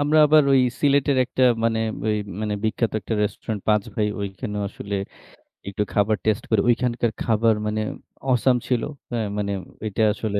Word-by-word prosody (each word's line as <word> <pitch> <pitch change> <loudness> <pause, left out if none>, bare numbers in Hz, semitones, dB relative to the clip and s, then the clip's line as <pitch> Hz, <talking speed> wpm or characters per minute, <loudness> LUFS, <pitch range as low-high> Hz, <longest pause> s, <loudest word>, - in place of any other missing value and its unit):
আমরা 150 +2 +3
আবার 155 0 +6
ওই 135 - +6 0.2
সিলেটের 140 -1 +3
একটা 130 +1 -2 0.2
মানে 115 -1 +2 0.3
ওই 105 -1 +2 0.2
মানে 105 -1 -1
বিখ্যাত 110 +1 0
একটা 110 +3 -3
রেস্টুরেন্ট 105 0 -3
'পাঁচ 105 -1 +4
ভাই' 105 -3 +1
ঐখানেও 100 +1 -4
আসলে 100 +1 -6 0.8
একটু 100 +1 -1
খাবার 105 +1 +3
টেস্ট 110 -1 +1
করে 110 -3 +3
ঐখানকার 120 -1 +1
খাবার 115 -1 +3
মানে 110 0 -1 0.5
awesome 125 0 +3
ছিল, 125 -3 +1 0.3
হ্যাঁ? 115 -3 -1
মানে 100 -1 -1 0.3
ওইটা 110 +1 0
আসলে 105 -2 -2
110 Hz, 160 wpm, -23 LUFS, 105-125 Hz, 0.8 s, আবার